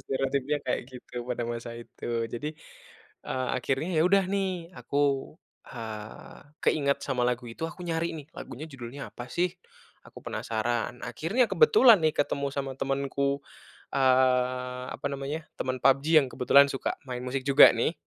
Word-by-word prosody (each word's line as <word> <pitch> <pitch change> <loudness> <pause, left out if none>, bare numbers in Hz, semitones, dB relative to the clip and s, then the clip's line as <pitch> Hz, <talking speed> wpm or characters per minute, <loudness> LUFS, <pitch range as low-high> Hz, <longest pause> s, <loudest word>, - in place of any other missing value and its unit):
stereotipnya 135 +2 -1
kayak 125 - 0
gitu, 125 -1 -8
pada 120 -1 -2
masa 115 0 -5
itu. 120 0 -4
Jadi, 120 +6 -3 0.8
eee, 130 -1 -2
akhirnya 135 +5 -1
ya - - +6
udah 195 0 +4
nih 185 -3 -2
aku, 140 - -1 0.7
eee, 110 -3 -8 0.3
keinget 140 -2 +2
sama 130 -3 -1
lagu 125 0 -2
itu, 115 - -11
aku 175 - -12
nyari 165 -1 -2
nih 150 -3 -9
lagunya 145 - -7
judulnya 135 +1 -8
apa 120 - -7
sih, 175 +7 0 0.5
aku - - -12
penasaran, 120 +2 -2
akhirnya 215 +11 +1
kebetulan 215 +3 +7
nih 155 - +4
ketemu 140 -1 0
sama 135 -1 -2
temenku, 140 0 -1 0.5
eee, 125 -1 +2
apa - - -5
namanya, 140 +3 -4 0.2
temen 130 0 -1
PUBG 135 +1 +4
yang 140 - -2
kebetulan 140 +3 +6
suka 135 - -2
main 125 -1 -4
musik 130 +1 -3
juga, 140 0 +9
nih. - - 0
135 Hz, 150 wpm, -28 LUFS, 125-150 Hz, 0.8 s, juga